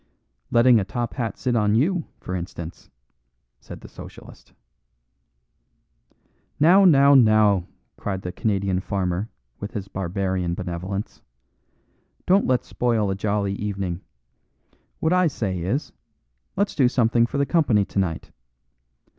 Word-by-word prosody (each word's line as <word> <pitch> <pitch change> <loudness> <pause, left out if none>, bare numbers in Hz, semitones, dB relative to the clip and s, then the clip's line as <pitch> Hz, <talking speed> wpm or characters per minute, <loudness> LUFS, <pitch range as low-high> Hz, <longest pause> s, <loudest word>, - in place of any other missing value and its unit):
"Letting 120 0 +5
a - - 0
top 120 +4 -4
hat 120 -4 -3
sit 125 -2 -1
on 105 -2 +2
you, 165 - +1
for 90 - -7
instance," 85 -1 -7 0.7
said - - -11
the - - -11
Socialist. - - -13 2.1
"Now, 180 +6 +6
now, 140 -5 +6
now," 110 -7 +4 0.3
cried 95 -2 -4
the 90 - -4
Canadian 100 -2 -1
farmer 95 +1 -2 0.3
with 100 - -7
his 100 -2 -5
barbarian 95 -2 -2
benevolence, 95 +3 -5 1.0
"don't 195 +3 +3
let's 130 -1 +1
spoil 115 -5 0
a - - -1
jolly 100 0 -1
evening. 100 -3 -4 1.0
What 160 +2 +1
I 180 -1 +4
say 100 - -3
is, 105 - -2 0.6
let's 200 +1 0
do 130 -4 +3
something 120 -1 +2
for 140 - -4
the 140 - +2
company 130 - +2
tonight. 95 -4 -3
105 Hz, 125 wpm, -23 LUFS, 95-125 Hz, 2.1 s, Now